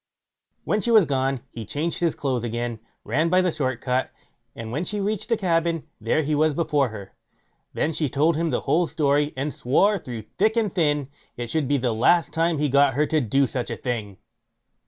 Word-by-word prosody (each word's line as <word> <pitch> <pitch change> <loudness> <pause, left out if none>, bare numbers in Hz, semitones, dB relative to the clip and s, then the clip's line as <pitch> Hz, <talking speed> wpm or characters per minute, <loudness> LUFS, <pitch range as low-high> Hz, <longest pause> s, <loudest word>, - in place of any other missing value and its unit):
When 210 - 0
she 235 - -1
was 220 -5 +6
gone, 135 -2 -1
he 115 - -7
changed 145 - -2
his 170 -2 +1
clothes 130 -4 -2
again, 120 0 -3 0.2
ran 155 +9 +1
by 185 +2 +4
the 180 -1 +1
short 130 -5 -2
cut, 125 0 0 0.5
and 115 -1 -7
when 150 +7 -2
she 210 +3 -3
reached 210 +2 -2
the 230 - +2
cabin, 165 -3 0 0.2
there 115 +8 +1
he 150 +1 -1
was 155 0 +2
before 145 -5 +1
her. 100 -3 -10 0.6
Then 160 - 0
she 150 -2 -1
told 150 +5 +2
him 165 +1 0
the - - -1
whole 160 +5 +1
story, 145 0 +1
and 140 +2 -2
swore, 195 +11 +2
through 120 -8 -7
thick 215 - 0
and 215 -5 +1
thin, 150 -6 +1 0.3
it 120 -1 -5
should 155 -4 0
be 145 +1 +2
the 125 -3 0
last 160 +10 +3
time 165 0 +1
he 150 +1 +1
got 140 -1 +3
her 150 +2 +2
to 155 0 +1
do 135 +4 +2
such 125 -1 -3
a - - -4
thing. 110 -6 -4
145 Hz, 210 wpm, -24 LUFS, 125-165 Hz, 0.6 s, was